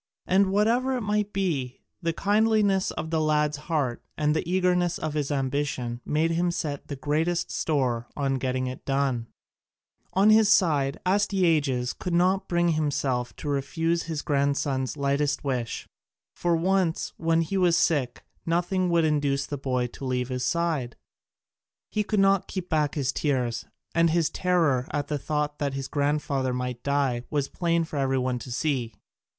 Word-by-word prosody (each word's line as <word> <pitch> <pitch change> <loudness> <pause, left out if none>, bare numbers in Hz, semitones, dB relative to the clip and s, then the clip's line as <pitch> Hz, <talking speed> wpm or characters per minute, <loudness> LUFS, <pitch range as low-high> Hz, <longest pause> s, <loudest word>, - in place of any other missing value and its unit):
And 195 +2 +3
whatever 240 +6 +2
it - - -3
might 210 -1 0
be, 150 -10 -2 0.2
the 165 -1 0
kindliness 205 +1 +2
of 160 +1 -5
the 160 -1 +1
lad's 150 -1 +1
heart 140 -7 0 0.2
and 150 0 +1
the 160 +2 -2
eagerness 180 -2 +2
of 155 - -3
his 150 -2 -1
ambition 130 -3 -2
made 160 +2 +1
him 175 +1 +1
set 150 -4 -3
the 145 - -4
greatest 155 +5 -1
store 125 -6 0
on 135 -2 0
getting 130 0 -1
it 130 0 -6
done. 135 -4 0 0.9
On 200 +3 +5
his 215 -1 +5
side, 145 -9 +3
Astyages 165 -10 +2
could 180 -2 -3
not 185 +2 +2
bring 175 0 +2
himself 140 -6 -1
to - - -8
refuse 165 +4 0
his 160 -3 -4
grandson's 140 -1 0
lightest 140 0 0
wish. 125 -5 -3 0.5
For 175 -1 +1
once, 180 0 0
when 165 0 +2
he 180 +5 -4
was 180 -3 +3
sick, 140 -7 +1 0.2
nothing 175 +2 0
would 170 -1 +3
induce 145 -2 +1
the 145 - -4
boy 130 -2 -1
to 125 - -9
leave 125 -1 -1
his 125 -1 -2
side; 160 -8 -1 1.0
he 210 - 0
could 210 0 0
not 195 -1 +3
keep 185 -2 -5
back 150 -2 +1
his 140 -3 0
tears, 125 -7 -1 0.3
and 165 0 +4
his 165 -1 +1
terror 165 -9 +1
at 145 -1 -3
the 150 -1 -1
thought 150 0 -2
that 140 -2 -1
his 135 -1 -4
grandfather 140 -3 0
might 125 -1 -3
die 140 -4 0
was 145 -2 0
plain 170 +1 0
for 160 -2 -6
every 135 -1 +1
one 125 -1 -1
to 125 - -9
see. 125 -5 -1
150 Hz, 165 wpm, -26 LUFS, 135-175 Hz, 1.0 s, On